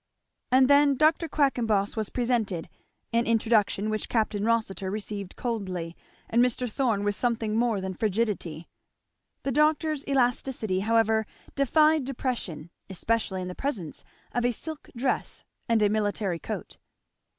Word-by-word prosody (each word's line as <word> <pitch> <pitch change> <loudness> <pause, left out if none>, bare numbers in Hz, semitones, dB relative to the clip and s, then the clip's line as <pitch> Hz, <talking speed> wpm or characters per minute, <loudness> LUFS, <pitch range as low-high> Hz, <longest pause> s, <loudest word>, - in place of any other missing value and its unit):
And 260 0 +6
then 285 0 +5
Dr. 315 +3 +3
Quackenboss 230 -8 +1
was 220 -2 -2
presented, 230 -8 -1 0.4
an 235 0 +2
introduction 215 -2 +2
which 215 - -3
Capt. 220 -3 +1
Rossitur 205 -2 0
received 200 -1 -5
coldly, 185 -8 -3 0.3
and 235 +2 +3
Mr. 250 0 0
Thorn 225 -4 0
with 205 0 +1
something 225 -1 -1
more 230 -2 +2
than 190 0 -4
frigidity. 195 -6 -1 0.8
The 275 - -1
doctor's 305 +1 +2
elasticity 245 -6 +1
however 220 +1 +2 0.3
defied 305 +1 +3
depression, 235 - -4 0.2
especially 190 -1 -1
in - - -5
the 180 - -5
presence 200 - -4 0.3
of 245 - -1
a 245 0 +2
silk 315 +6 -7
dress 255 +2 -1 0.3
and 225 -2 +3
a - - +5
military 205 -4 0
coat. - - -6
225 Hz, 135 wpm, -27 LUFS, 200-255 Hz, 0.8 s, And